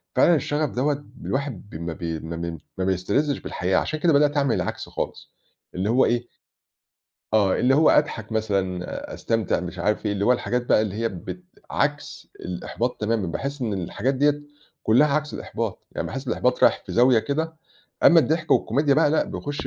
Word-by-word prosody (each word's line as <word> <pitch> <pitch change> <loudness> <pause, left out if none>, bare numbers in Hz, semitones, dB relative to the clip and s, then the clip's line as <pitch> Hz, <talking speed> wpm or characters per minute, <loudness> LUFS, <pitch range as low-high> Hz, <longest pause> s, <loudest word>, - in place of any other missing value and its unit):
فعلًا 175 - +5
الشغف 150 0 0
دوّة 145 +3 -1 0.2
الواحد 135 -8 -3
بم 85 -1 -5
بي 80 0 -4
ما 80 +1 -6
بي 85 0 -4 0.2
ما 95 - -1
بيستلذِّش 100 +10 0
بالحياة، 95 +1 -1
عشان 155 - -1
كده 165 0 +3
بدأت 145 +1 +3
أعمل 140 -4 +2
العكس - - -3
خالص - - -5 0.4
اللي 95 +4 -1
هو 125 +3 +4
إيه 120 0 0 1.1
آه، 100 -3 +4
اللي 130 +2 +4
هو 155 +2 +5
أضحَك 115 -7 +1
مثلًا، 95 -5 -2
أستمتع، 115 -6 0
مش 90 0 -7
عارف 105 +4 0
إيه، 100 - +1
اللي 100 0 -1
هو 125 - +5
الحاجات 125 0 -1
بقى 110 - +4
اللي 105 -3 -3
هي 115 +1 0
بت 100 - -8 0.3
عكْس 145 0 -2
الإحباط 115 +7 -4
تمامًا، 110 -2 0
باحس 140 - -4
إن 110 - -1
الحاجات 100 +8 -1
ديّة 145 +2 +2 0.4
كلّها 120 +8 +5
عكس 150 +1 -1
الإحباط، - - -4
يعني - - -3
باحس 135 +1 -6
إن - - -5
الإحباط 125 0 0
رايح - - +4
في - - -6
زاوية 125 -1 +5
كده، 160 +6 -2 0.5
أمّا 170 -1 +8
الضحك 160 +1 -1
والكوميديا 140 +4 +3
بقى 155 0 +4
لأ 155 - +2
بيخُش 145 0 -5
120 Hz, 185 wpm, -24 LUFS, 100-145 Hz, 1.1 s, أمّا